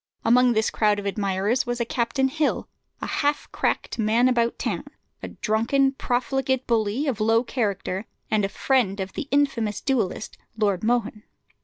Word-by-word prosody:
Among 245 +1 +5
this 220 0 +1
crowd 210 -1 +2
of 205 - -5
admirers 200 +4 0
was 240 0 -2
a 235 - 0
Captain 245 +3 0
Hill, 305 +3 -1 0.4
a - - 0
half 290 0 0
cracked - - -1
man 225 +3 +3
about 235 -2 +1
town, - - -3 0.4
a - - -5
drunken, 235 +5 +1
profligate 260 0 -1
bully, 225 +4 0
of 260 -7 -1
low 225 +2 +3
character, 205 -5 -2 0.2
and 215 -1 +2
a 195 - 0
friend 215 -4 +1
of 190 0 -4
the 295 - -5
infamous 255 -7 +1
duellist, 225 -6 -2 0.2
Lord 200 -4 +1
Mohun. 225 -2 0
230 Hz, 160 wpm, -24 LUFS, 210-260 Hz, 0.4 s, Among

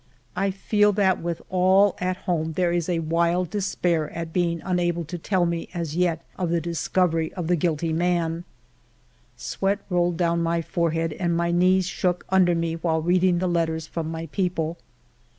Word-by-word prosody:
I 195 +2 +1
feel 205 +2 +2
that 190 -2 +2
with 170 0 -4
all 190 +2 +4
at 185 0 -1
home 160 -2 -1
there 175 +1 +1
is 175 0 -1
wild 170 +1 +1
despair 180 -6 0
at 165 -1 -5
being 170 -2 +1
unable 175 -2 0
to 175 +4 -6
tell 185 +1 +1
me 170 -1 -2
as 165 -3 -3
yet 175 -2 0
of 180 -2 0
the 170 0 +1
discovery 165 0 0
of 180 - -3
the 175 +2 +2
guilty 165 -1 0
man. 170 0 0 0.9
Sweat 195 +1 -1
rolled 175 -1 +1
down 170 -1 +1
my 170 0 0
forehead 165 -2 -1
and 170 0 -1
my 170 0 +1
knees 185 +2 +3
shook 180 -1 -1
under 180 -2 +4
me 165 0 -1
while 160 -1 0
reading 180 +1 +3
the 185 - -1
letters 165 -2 0
from 160 0 -4
my 165 0 -4
people. 175 -4 -1
170 Hz, 170 wpm, -24 LUFS, 165-180 Hz, 0.9 s, all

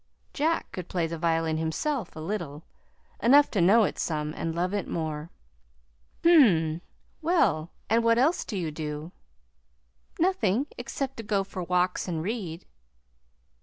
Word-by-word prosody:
(Jack 320 +3 0
could 180 -2 -7
play 175 -3 0
the 165 0 -5
violin 165 -1 +1
himself 190 - -2
a - - -7
little 160 -4 -4 0.6
enough 280 +5 +6
to 200 - +1
know 210 +6 +6
it - - -2
some, 150 -2 -2
and 165 0 -3
love 180 +3 -1
it 205 - -2
more.) 155 -1 -3 0.9
"Hm - - +4
m; 165 - +3 0.4
well, 240 - +2 0.2
and 230 +2 +2
what 230 0 +4
else 295 +8 +2
do 210 - -5
you 165 -4 -2
do?" 150 +1 -5 1.1
"Nothing, 275 - +2
except 260 +2 -4
to 225 - -5
go 205 -2 0
for 190 -1 -7
walks 180 +1 0
and 165 -3 -2
read." 185 -5 -4
180 Hz, 150 wpm, -27 LUFS, 160-230 Hz, 1.1 s, enough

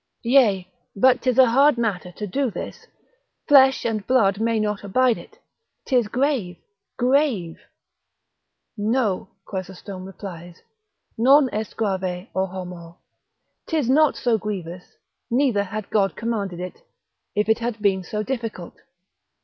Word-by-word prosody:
Yea, 230 -7 +3 0.3
but 255 +5 +4
'tis 255 -2 0
a 260 - +8
hard 275 +2 +5
matter 195 -6 -2
to 210 - -6
do 260 +7 -1
this, - - -8 0.6
flesh 265 -3 +6
and 215 -3 -2
blood 215 -6 +3
may 230 -1 +1
not 210 -1 -2
abide 245 +4 +2
it; - - -13 0.5
'tis 250 -5 +2
grave, 245 - -1 0.4
grave! 245 - +1 1.2
no 210 -3 0 0.2
(Chrysostom 190 0 -7
replies) 175 -3 -10 0.6
non 265 +2 +5
est 215 0 -4
grave, 190 -4 -2
o 190 0 0
homo! 180 -2 -9 0.7
'tis 300 -7 0
not 305 +2 +4
so 235 -3 +1
grievous, 180 -4 -6 0.3
neither 240 -5 +2
had 210 +2 -6
God 195 -2 +1
commanded 205 -6 -3
it, 180 - -7 0.5
if 210 +1 +1
it 220 +1 +3
had 235 -1 -3
been 195 -2 +1
so 210 +3 -3
difficult. 225 -8 -5
215 Hz, 130 wpm, -23 LUFS, 190-250 Hz, 1.2 s, a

